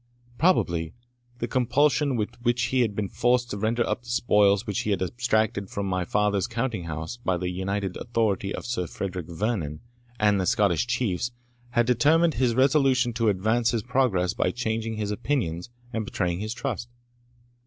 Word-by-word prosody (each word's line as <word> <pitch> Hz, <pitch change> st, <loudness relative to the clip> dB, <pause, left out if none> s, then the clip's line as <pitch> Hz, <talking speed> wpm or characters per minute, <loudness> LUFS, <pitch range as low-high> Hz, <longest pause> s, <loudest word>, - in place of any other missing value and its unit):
Probably 85 Hz, -, +2 dB, 0.4 s
the 120 Hz, -, -3 dB
compulsion 140 Hz, +3 st, +2 dB
with 105 Hz, -3 st, -1 dB
which 120 Hz, 0 st, +1 dB
he 130 Hz, -, +4 dB
had 110 Hz, -4 st, 0 dB
been 105 Hz, -1 st, -1 dB
forced 120 Hz, +3 st, +1 dB
to 105 Hz, -, -3 dB
render 115 Hz, +3 st, +1 dB
up -, -, -1 dB
the 120 Hz, -, -13 dB
spoils 105 Hz, -3 st, +3 dB
which 105 Hz, -3 st, -2 dB
he -, -, -2 dB
had 100 Hz, -3 st, +1 dB
abstracted 110 Hz, -1 st, 0 dB
from 100 Hz, -, -3 dB
my 90 Hz, -2 st, -1 dB
father's 105 Hz, +1 st, +1 dB
counting 115 Hz, -6 st, -2 dB
house 80 Hz, +7 st, -5 dB
by 95 Hz, -7 st, -1 dB
the 90 Hz, +1 st, -2 dB
united 95 Hz, +1 st, -2 dB
authority 110 Hz, -5 st, -1 dB
of -, -, -5 dB
Sir 90 Hz, -7 st, -2 dB
Frederick 90 Hz, -3 st, -5 dB
Vernon 85 Hz, -5 st, -2 dB, 0.4 s
and 105 Hz, -2 st, +3 dB
the 90 Hz, -, -1 dB
Scottish 105 Hz, -4 st, +2 dB
Chiefs, 120 Hz, -3 st, 0 dB, 0.4 s
had 120 Hz, -1 st, +2 dB
determined 150 Hz, +8 st, +4 dB
his 125 Hz, -4 st, +1 dB
resolution 130 Hz, -2 st, +3 dB
to 115 Hz, -1 st, +2 dB
advance 110 Hz, +4 st, +1 dB
his 115 Hz, -3 st, -1 dB
progress 120 Hz, -8 st, +1 dB
by -, -, +1 dB
changing 115 Hz, +1 st, -2 dB
his 105 Hz, -1 st, -2 dB
opinions 105 Hz, -, -2 dB, 0.2 s
and 110 Hz, -1 st, -1 dB
betraying 90 Hz, -4 st, -2 dB
his 110 Hz, +3 st, -4 dB
trust. 120 Hz, -2 st, -4 dB
110 Hz, 175 wpm, -26 LUFS, 95-120 Hz, 0.4 s, he